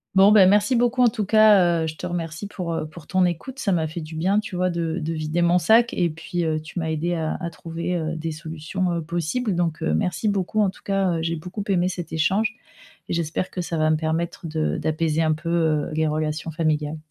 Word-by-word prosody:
Bon, 195 +2 +7
bah, 205 -3 +7
merci 205 +6 +3
beaucoup, 245 +1 +3
en 240 - +6
tout 215 -1 -3
cas, 195 -6 +5
heu, - - -1
je 155 - -5
te - - -5
remercie 170 +1 -4
pour, 180 -4 -4
heu, 160 -1 -3
pour 155 0 -12
ton 185 +3 +2
écoute, 180 - -4
ça 205 - 0
m'a 165 -3 +1
fait 165 +2 -6
du 155 +1 -8
bien 190 +6 +2
tu 210 -3 -6
vois 180 +1 +1
de 165 -1 -2
de 160 0 -3
vider 155 +2 -1
mon 175 +1 +4
sac, 225 +7 +4
et 175 -2 +1
puis, 170 +2 -4
heu, 160 -1 0
tu 155 +3 -7
m'as 160 -1 -2
aidé 160 +3 -1
à 160 -2 -2
à 170 -2 -3
trouver, 170 +2 -4
heu, 165 -1 -2
des 160 0 -3
solutions, 160 +3 -3
heu, 170 - -1
possibles 175 +8 -2
donc, 170 -2 -1
heu, 75 - +1
merci 180 - 0
beaucoup 205 +1 0
en 200 - +3
tout - - -19
cas, 195 -3 +1
heu, - - -2
j'ai 165 +1 -1
beaucoup 180 +6 -6
aimé 180 -3 +2
cet 175 -3 -5
échange 205 +8 +1 0.5
et - - -1
j'espère 170 +2 -2
que 180 - -3
ça 170 -1 -3
va 155 0 +2
me - - +4
permettre 165 +2 -2
de 155 0 -1
d'apaiser 155 0 0
un 155 -1 +2
peu, 155 +2 -5
heu, 160 -3 +1
les 160 0 +1
relations 155 +1 -2
familiales. 155 -1 -1
170 Hz, 245 wpm, -23 LUFS, 160-185 Hz, 0.5 s, Bon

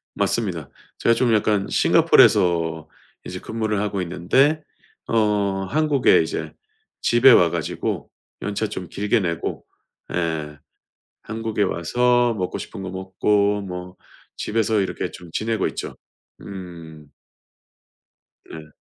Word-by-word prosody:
맞습니다. - - -1 0.3
제가 115 - +3
좀 120 -2 +2
약간 105 -2 +2
싱가포르에서 80 -3 +4 0.4
이제 90 - -6
근무를 110 -1 -2
하고 100 -2 -1
있는데 135 - +2 0.5
어 105 -3 +1
한국에 150 +3 +3
이제 - - -4 0.5
집에 120 +3 +6
와 85 -7 +6
가지고 - - -3 0.3
연차 105 +1 -2
좀 95 -3 -6
길게 105 +5 +1
내고 85 -3 -3 0.5
예. 80 -3 -2 0.7
한국에 110 -1 -3
와서 120 +6 +2
먹고 90 -4 -3
싶은 95 - -8
거 95 - -5
먹고 100 +2 +1
뭐 90 -1 -7 0.4
집에서 110 -1 0
이렇게 95 - -3
좀 85 -2 -12
지내고 110 +3 -1
있죠. - - -6 0.4
음. 85 -5 -10 1.4
네. 75 -1 -10
100 Hz, 230 characters per minute, -22 LUFS, 90-110 Hz, 1.4 s, 집에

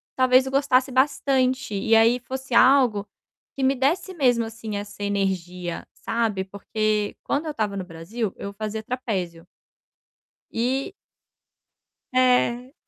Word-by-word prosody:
Talvez 255 0 +4
eu 265 - -4
gostasse 270 -1 +2
bastante 260 -2 +1
e 220 +3 +2
aí 230 +2 +5
fosse 260 +1 -6
algo 245 -5 +5 0.5
que 270 - -3
me 265 +1 +4
desse 305 +9 0
mesmo, 250 -8 +2
assim, 220 -1 -6
essa 205 0 -8
energia, 180 -3 -2
sabe, 225 -4 -1
porque 210 +2 -2
quando 290 +3 -1
eu 310 - -2
estava 210 -7 -2
no 185 - -4
Brasil, 185 +6 -5
eu 200 - -6
fazia 215 +1 -4
trapézio. 190 -9 -4 1.1
E 255 +6 -1 1.2
É. 250 0 +2
230 Hz, 125 wpm, -24 LUFS, 205-260 Hz, 1.2 s, aí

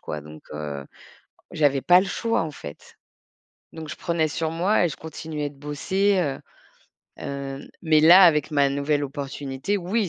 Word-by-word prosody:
quoi. 75 - -5
Donc, 75 +1 -13
heu, 75 -2 -5 0.7
j'avais 140 -3 +2
pas 180 0 +6
le 195 - -2
choix 230 +2 -1
en 160 - -4
fait. 75 - -11 0.8
Donc 160 -1 -8
je 155 - -6
prenais 170 -2 0
sur 160 +2 -2
moi 180 +5 +2
et - - -1
je 150 - -7
continuais 155 -2 -5
de 140 - -19
bosser, 190 +7 0
heu, 140 -6 -2 0.8
heu, 140 0 -6
mais 155 -2 +4
là, 175 +5 +9
avec 150 -3 +3
ma 140 -2 +3
nouvelle 145 +1 0
opportunité, 140 +4 -4
oui, 195 +3 -1
150 Hz, 165 wpm, -24 LUFS, 140-170 Hz, 0.8 s, là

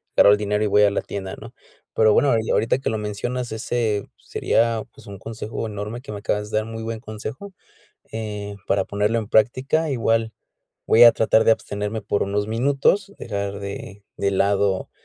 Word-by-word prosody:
agarro 100 - +7
el 105 - +5
dinero 105 0 0
y - - +2
voy 105 +1 +4
a 100 - +4
la 100 - -1
tienda, 95 -1 -6
¿no? - - -11 0.4
Pero 110 -1 +5
bueno, 140 +3 +4
ya, 110 - -1
ahorita 115 +3 +2
que 135 - -2
lo 110 - -1
mencionas, 115 +4 -3
ese 110 -2 -1
sería, 115 -1 0
pues, - - -16
un 100 -1 -8
consejo 115 +1 -5
enorme 105 +3 -5
que 125 - -9
me 105 - -5
acabas 105 +1 -2
de - - +1
dar, 110 - 0
muy 115 0 -7
buen 115 0 -4
consejo, 110 - -8 0.6
eh, 105 -2 -5
para 95 -1 +1
ponerlo 105 +4 0
en 110 -3 -4
práctica. 130 +9 +2
Igual, 115 -3 +1 0.5
voy 115 +2 +7
a 120 - +9
tratar 110 0 +3
de 115 - +6
abstenerme 105 0 -3
por 100 0 0
unos 100 +1 -1
minutos, 140 - +1
dejar 100 -2 -4
de 100 0 -7
de 100 - 0
lado 100 0 +1
110 Hz, 190 wpm, -22 LUFS, 100-115 Hz, 0.6 s, a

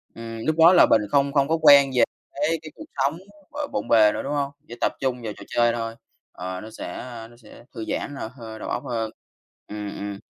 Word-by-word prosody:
Ừm, 115 0 -7
lúc 155 0 +1
đó 165 +2 +8
là 180 - +7
mình 110 - +6
không 140 0 +2
không 140 -1 +2
có 165 +1 +2
quen 140 -2 +8
về 120 -2 +5 0.3
cái 150 +3 0
cái 155 - -9
cuộc - - -10
sống, 140 +5 0 0.3
ờ, 295 0 -4
bộn - - -3
bề 105 -2 +6
nữa, - - -3
đúng 140 - -4
hông? 140 -1 0 0.2
Chỉ 120 - -7
tập - - +2
trung 125 -2 -1
vào 110 -2 -4
trò - - -11
chơi 120 0 +3
thôi. 115 -1 -3 0.4
Ờ, 90 +1 -6
nó 110 - -9
sẽ, 110 - -7
ơ, 115 -3 -8
nó 120 - -17
sẽ 115 0 -16
thư 115 -2 -5
giãn 145 - -3
là 125 -5 -5
hơ 110 -3 -9
đầu - - -6
óc - - -3
hơn. 115 -4 -2 0.6
Ừm, 105 -1 -5
ừm. 100 0 -5
120 Hz, 245 wpm, -24 LUFS, 110-140 Hz, 0.6 s, đó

